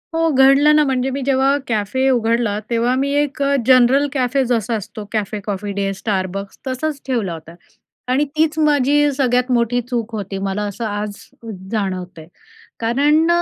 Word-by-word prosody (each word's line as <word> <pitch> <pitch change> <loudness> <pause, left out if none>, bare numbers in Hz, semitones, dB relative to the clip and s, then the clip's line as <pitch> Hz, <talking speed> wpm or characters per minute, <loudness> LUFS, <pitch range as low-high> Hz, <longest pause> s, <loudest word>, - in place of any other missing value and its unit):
हो 330 0 +2
घडलं 275 +2 +5
ना, 300 - +5
म्हणजे 265 -1 0
मी 275 +1 -3
जेव्हा 270 +1 +2
कॅफे 235 +4 0
उघडला, 230 -3 +1
तेव्हा 235 +1 +1
मी 275 +2 0
एक 285 -1 -4 0.3
जनरल 260 +2 +5
कॅफे 265 0 +1
जसा 230 -1 0
असतो, 215 +1 -7
Cafe 210 0 -2
Coffee 200 0 -3
Day, 195 0 0
Starbucks 195 -1 -3
तसंच 275 +3 -3
ठेवला 225 -9 -1
होता 165 +1 -11 0.6
आणि 280 +3 +2
तीच 315 0 +2
माझी 290 -1 +3
सगळ्यात 250 -1 +1
मोठी 245 0 +1
चूक 235 -2 -2
होती. 195 -2 -5
मला 195 +1 -2
असं 215 +3 -5
आज 205 0 -3 0.6
जाणवतयं, 185 -6 -4 0.5
कारण 290 +8 +2
245 Hz, 150 wpm, -19 LUFS, 210-275 Hz, 0.6 s, घडलं